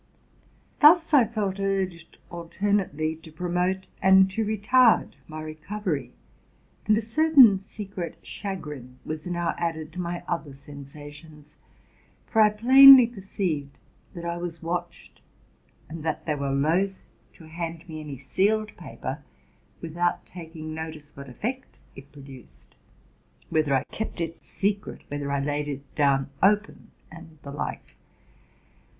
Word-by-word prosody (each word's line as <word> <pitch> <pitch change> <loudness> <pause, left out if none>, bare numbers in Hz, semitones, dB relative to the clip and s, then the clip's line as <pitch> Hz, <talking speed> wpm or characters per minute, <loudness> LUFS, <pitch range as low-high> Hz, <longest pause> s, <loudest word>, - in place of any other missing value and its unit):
SIXTH - - -36
BOOK. 300 +3 +9
Tuus 330 -3 -10
I 265 -5 +7
felt 205 -3 -3
urged 190 -4 -2
alternately 170 -2 -1
to 160 0 -14
promote 180 +3 -1 0.2
and 190 0 +6
to 220 +4 -1
retard 220 +3 +3 0.2
my 155 0 -7
recovery; 155 - -4 0.8
and 215 0 +4
a - - +1
certain 255 -4 +6
secret 195 -3 -7
chagrin 150 - -7
was 155 +2 -5
now 175 -1 -1
added 160 -2 -3
to 180 - -4
my 175 0 -4
other 165 -5 -3
sensations, 145 +2 -12 0.7
for 225 - +2
I 210 - +7
plainly 260 +4 +9
perceived 190 -10 -4 0.4
that 170 0 -7
I 170 0 -2
was 170 -1 -6
watched, 175 +1 -5 0.7
that 160 -1 -4
they 155 - 0
were 140 -1 -3
loath 165 +8 0 0.3
to - - -16
hand 165 +1 -6
me 155 -2 -7
any 145 -3 -7
sealed 210 - 0
paper 145 -3 -7 0.6
without 175 +2 -1
taking 160 -2 -9
notice 155 -2 -8
what 140 -1 -10
effect 245 - -5 0.2
it 135 +1 -13
produced, 135 -4 -14 0.8
whether 155 -4 +2
I 130 - +1
kept 220 -4 -5
it 165 -1 -4
secret, 200 +1 -3
whether 145 -1 -4
I 140 0 0
laid 145 +1 -2
it 140 -1 -7
down 140 -2 +1
open 210 +3 +1 0.2
and 165 -1 -13
the 140 - -8
like. 145 - -6
170 Hz, 135 wpm, -26 LUFS, 150-200 Hz, 0.8 s, BOOK